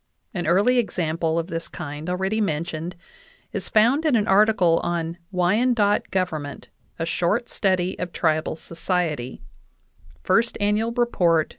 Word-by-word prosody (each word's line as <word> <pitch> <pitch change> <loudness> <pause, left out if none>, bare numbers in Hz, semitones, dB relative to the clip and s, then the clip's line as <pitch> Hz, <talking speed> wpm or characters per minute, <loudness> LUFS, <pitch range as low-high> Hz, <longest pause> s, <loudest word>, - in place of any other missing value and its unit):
An 175 -5 -3
early 205 +9 +4
example 165 -6 -1
of 165 - 0
this 165 -2 -5
kind, 155 0 -6
already 190 +4 0
mentioned, 165 -1 -2 0.6
is - - -4
found 235 +8 +4
in 305 -5 +3
an 215 -2 +1
article 195 -4 +4
on 170 0 -3
"Wyandot 205 +4 +2
government: 155 -7 -3 0.3
a 165 - -2
short 180 +8 0
study 185 -2 0
of 180 -1 -3
tribal 155 -2 0
society" 165 -6 -3 0.8
(First 225 +5 +2
Ann. 205 0 +2
Rept. 180 -10 +2
180 Hz, 130 wpm, -23 LUFS, 165-210 Hz, 0.8 s, early